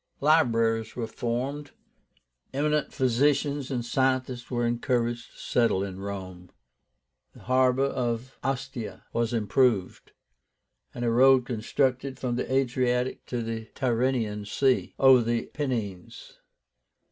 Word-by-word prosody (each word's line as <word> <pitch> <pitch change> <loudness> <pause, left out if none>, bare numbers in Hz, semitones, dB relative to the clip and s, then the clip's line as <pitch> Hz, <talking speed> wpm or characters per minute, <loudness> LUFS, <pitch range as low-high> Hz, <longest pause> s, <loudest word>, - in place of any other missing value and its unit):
Libraries 115 -7 +2
were 120 - -2
formed. 130 +6 -4 0.8
Eminent 150 +1 0
physicians 140 +2 +1
and 125 -4 -2
scientists 130 -1 0
were 120 -2 0
encouraged 120 0 -1
to - - -21
settle 115 -6 +1
in 95 -1 -6
Rome. 95 -3 -7 0.8
The - - -16
harbor 130 +1 +2
of 125 -1 -2
Ostia 135 -3 -4
was 115 0 0
improved, 115 -2 +1 0.8
and 120 - -3
a 115 - +2
road 130 +1 +5
constructed 130 +3 -1
from 125 -3 -2
the 125 - -3
Adriatic 125 -1 0
to 120 -2 -3
the 115 0 -4
Tyrrhenian 120 -4 0
Sea, 130 +4 +1
over 130 -2 +7
the 115 0 0
Apennines. 110 -11 -5
125 Hz, 115 wpm, -27 LUFS, 115-130 Hz, 0.8 s, over